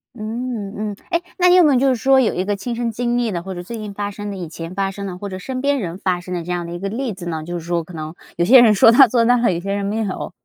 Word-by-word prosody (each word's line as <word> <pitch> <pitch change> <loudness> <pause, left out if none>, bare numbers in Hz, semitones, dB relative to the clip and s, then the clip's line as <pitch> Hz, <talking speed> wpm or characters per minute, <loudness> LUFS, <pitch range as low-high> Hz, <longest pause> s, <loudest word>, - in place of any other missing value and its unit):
嗯， 220 -2 -5 0.2
嗯。 - - -8 0.2
诶， 340 0 +1 0.2
那 360 -1 +4
你 360 - +6
有 360 - +7
没 295 -3 +4
有 250 - +3
就 270 0 +3
是 255 - +2
说 265 +3 +4
有 240 - +2
一 180 - -1
个 205 0 0
亲 235 +4 -5
身 235 -1 -2
经 240 +2 -1
历 235 -3 0
的， 170 -1 -4
或 190 0 -6
者 175 - -6
最 230 +6 -7
近 210 -2 -7
发 205 0 -3
生 205 0 -6
的、 195 - -6
以 175 -3 -5
前 165 +2 -8
发 195 0 -1
生 200 +1 -7
的， 180 -2 -6
或 200 +1 -6
者 185 - -6
身 255 +7 -5
边 280 -1 +1
人 175 -3 -4
发 185 -2 -1
生 180 +1 -7
的 175 -2 -3
这 180 - -5
样 175 -1 -2
的 170 - -7
一 175 - -6
个 195 +1 -3
例 235 0 -3
子 180 -2 -9
呢？ 160 -2 -3
就 175 +1 -5
是 165 - -11
说 170 -1 -1
可 175 - -13
能 155 0 -6 0.2
有 170 - +2
些 250 +4 +8
人 220 -3 +6
说 225 +3 +6
到 260 +2 +8
做 230 0 +2
到 245 +1 +4
了， 235 -5 +2
有 170 - -2
些 195 +2 -3
人 200 0 -2
没 210 +2 -2
有。 205 -4 -3
205 Hz, 375 characters per minute, -20 LUFS, 180-240 Hz, 0.2 s, 些